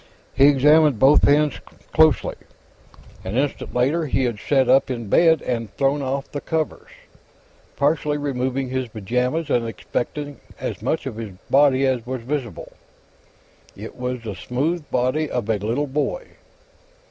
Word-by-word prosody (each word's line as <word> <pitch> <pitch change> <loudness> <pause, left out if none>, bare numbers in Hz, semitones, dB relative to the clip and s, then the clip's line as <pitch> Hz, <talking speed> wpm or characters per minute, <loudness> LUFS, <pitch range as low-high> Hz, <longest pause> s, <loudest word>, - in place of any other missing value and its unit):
He 135 - +5
examined 145 0 +5
both 135 +7 +5
hands 150 0 +3 0.3
closely. 155 -7 +4 0.9
An 95 +5 -3
instant 140 +1 -2
later, 145 +6 +1
he 135 -1 0
had 120 -4 -2
sat 135 0 +2
up 135 - +4
in 120 -5 -4
bed 165 +2 +4
and 115 -4 -3
thrown 140 +1 +1
off 135 +1 -3
the 145 - -5
covers, 160 -2 -3 0.9
partially 145 +1 +1
removing 130 -2 -2
his 130 -1 -2
pajamas 125 - -2
and 120 - +2
inspecting 145 +5 -5 0.2
as - - -5
much - - -1
of 110 - -5
his 110 -4 -6 0.2
body 135 -1 +4
as 130 -3 0
was 125 0 -5
visible. 130 -2 -5 1.1
It - - -9
was 125 -1 -4
the 110 -3 -5
smooth 145 - -3
body 130 +5 0
of 120 -4 -3
a 110 -2 0
little 115 +8 -1
boy. 150 - -3
135 Hz, 145 wpm, -22 LUFS, 125-145 Hz, 1.1 s, He